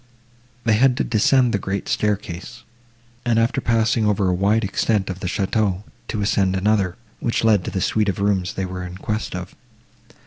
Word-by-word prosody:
They 115 - +3
had 125 +3 +4
to - - +1
descend 125 +2 +3
the 100 - +1
great 95 +1 -3
staircase, 105 +2 -2 0.6
and, 120 -2 +1
after 115 +4 +2
passing 115 -1 +2
over 100 -2 +2
a - - +2
wide 100 +5 +2
extent 100 0 0
of 95 - -7
the 95 - -4
château, 100 0 0 0.2
to 105 - -3
ascend 95 -2 +1
another, 95 -2 +1 0.2
which 115 - -1
led 105 -5 +4
to - - -2
the 95 - -2
suite 105 +2 +1
of 95 - -2
rooms 100 -2 0
they 95 - -2
were 90 0 -5
in 90 0 -7
quest 110 +3 -3
of. - - -6
105 Hz, 185 wpm, -22 LUFS, 95-110 Hz, 0.6 s, had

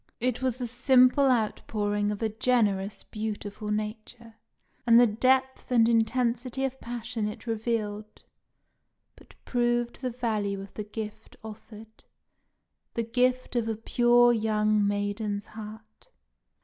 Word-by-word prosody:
It 250 +1 -1
was 255 -2 0
the 250 - -3
simple 255 +3 +4
outpouring 210 -3 0
of 210 +2 -4
a 220 - +1
generous, 210 -3 0
beautiful 210 -1 -5
nature, 215 +2 -5 0.5
and 230 0 +7
the 245 - +7
depth 260 +4 +1
and 235 -3 +4
intensity 235 +2 0
of 265 0 -5
passion 235 -2 -4
it 210 - -7
revealed 215 -2 -3 0.9
but - - -19
proved 240 0 0
the 255 - -1
value 215 -5 -2
of 195 0 -10
the 210 - -5
gift 210 0 -8
offered 220 0 -12 0.9
the 230 - 0
gift 250 +2 0
of 235 -2 0
a 225 - -1
pure 240 +2 +4
young 215 -2 +1
maiden's 205 0 -2
heart. 215 - -11
225 Hz, 125 wpm, -27 LUFS, 210-245 Hz, 0.9 s, and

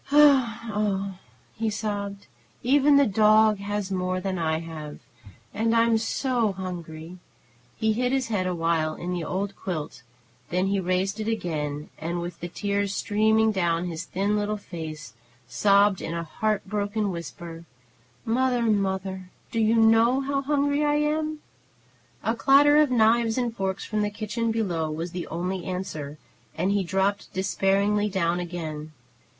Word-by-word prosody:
"O 290 - +3
o - - +9
oh 255 -6 +4
o 200 -2 0
oh!" 185 - -14 0.4
he 225 0 -1
sobbed. 205 -2 -4 0.4
"Even 280 +3 +5
the 280 - +6
dog 215 0 +4
has 205 -1 -3
more 185 -1 -1
than 185 -1 -3
I 160 -1 +1
have, 160 -2 -7 0.6
and 225 +2 +1
I'm 230 -1 +4
so 230 -2 0
hungry!" 175 -2 -7 0.6
He 220 0 +1
hid 250 +3 0
his 265 -3 0
head 190 -4 0
awhile 165 -3 0
in 180 +1 -4
the 175 -2 -2
old 195 +4 -3
quilt; 155 -7 -5 0.5
then 180 +2 +1
he 195 0 +1
raised 190 +3 -1
it 215 - -3
again, 155 -9 -3
and, 170 +2 -3
with 175 0 -6
the 175 - -4
tears 200 +2 -2
streaming 220 +1 +2
down 170 -3 0
his 170 -1 -4
thin 200 +4 -1
little 210 0 -1
face, 155 - -8 0.3
sobbed 200 - +3
in 165 - -4
a 170 - -2
heartbroken 205 +2 -1
whisper: 170 -1 -8 0.6
"Mother! 245 +1 +1
Mother! 190 -3 -1 0.2
Do 230 - -1
you 220 +1 +3
know 225 +3 +5
how 275 0 -1
hungry 285 +1 +1
I 295 0 +2
am?" 305 +1 0 0.8
A 225 - +1
clatter 280 +4 +5
of 300 -2 +5
knives 230 -1 +3
and 240 -2 -1
forks 190 -1 -2
from 215 -1 -1
the 210 - +1
kitchen 215 +2 -3
below 175 -8 -1
was 165 +3 -4
the 175 0 -5
only 180 +2 -3
answer, 155 -6 -5 0.4
and 180 +4 +1
he 200 -1 +1
dropped 195 +3 -1
despairingly 200 +2 +1
down 175 -3 0
again. 160 -3 -5
200 Hz, 155 wpm, -26 LUFS, 175-225 Hz, 0.8 s, o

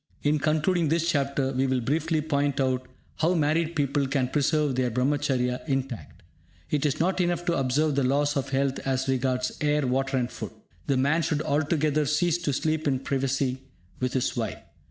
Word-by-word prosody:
In 150 +1 +2
concluding 155 +2 +1
this 165 +1 +1
chapter, 140 -4 0
we 130 +1 +1
will 130 -1 +1
briefly 155 +5 0
point 145 -2 0
out 130 -1 0 0.3
how 170 +3 +2
married 160 +1 +1
people 140 -1 +1
can 130 -2 0
preserve 150 0 +1
their 125 0 +1
Brahmacharya 125 0 0
intact. 135 -4 -4 0.5
It 150 0 +2
is 145 +1 -2
not 185 +3 +1
enough 175 -1 0
to 175 - +1
observe 140 +4 +1
the 140 0 +1
laws 145 +3 +1
of 140 - -1
health 135 0 0
as 130 0 -1
regards 130 -1 0
air, 150 -1 +2
water 135 +1 0
and 125 -1 -1
food. - - -7 0.3
The 135 - +2
man 140 +5 +2
should 150 -1 -1
altogether 150 0 +1
cease 165 +3 +1
to 165 -4 -1
sleep 155 +2 -1
in 130 -2 +1
privacy 135 -1 -1 0.4
with 125 0 -1
his 130 - 0
wife. - - -2
140 Hz, 180 wpm, -26 LUFS, 130-155 Hz, 0.5 s, In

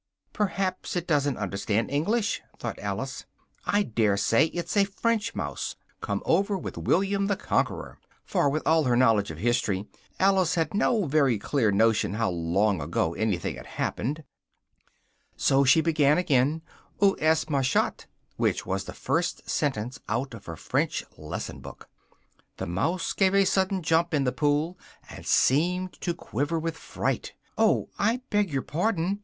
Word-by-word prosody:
"Perhaps 195 -3 -1
it 175 -1 -1
doesn't 145 -5 +1
understand 100 +3 -1
English," 205 +10 0 0.2
thought - - -5
Alice; - - -4 0.4
"I 205 0 +2
daresay 110 - +2
it's 170 +4 -4
a 200 - +5
French 215 +2 -1
mouse, - - -4 0.3
come - - -2
over 200 0 +2
with - - -6
William 195 +2 +1
the 200 - +1
Conqueror!" - - -2 0.3
(for, 145 - +2
with 155 +3 -1
all 160 -1 +3
her 125 -1 +3
knowledge 115 -5 +3
of 80 - -7
history, 105 -2 0 0.3
Alice 190 -3 +3
had 160 -3 0
no 215 0 +2
very 140 -5 +3
clear 110 +1 +1
notion 105 0 +2
how 115 -3 0
long 90 +3 +1
ago 80 - -1
anything 100 -5 -1
had - - -10
happened,) 150 +7 -2 1.1
so 135 +1 +3
she 140 +4 +5
began 155 -3 +3
again: 150 -2 +2 0.4
"où 200 -1 +4
est 160 +1 +3
ma 140 -2 +2
chatte?" 130 0 0 0.3
which - - 0
was 95 +1 -2
the - - -7
first - - -2
sentence 130 -1 -1
out 120 +4 -1
of 115 - -10
her 85 - -5
French - - -1
lesson - - -6
book. - - -11 0.7
The - - -3
mouse 160 - -1
gave 190 -1 +2
a 200 0 +5
sudden 190 -1 +1
jump 165 +1 +2
in 140 - +2
the 125 - +1
pool, 150 +5 0 0.3
and - - -10
seemed 180 +6 +2
to 175 -2 -1
quiver 145 +1 -2
with 165 0 -2
fright: - - -3 0.2
"oh, - - +2
I 230 +5 +1
beg 205 -2 +2
your 135 -2 -1
pardon!" 185 +3 -1
150 Hz, 160 wpm, -27 LUFS, 115-185 Hz, 1.1 s, a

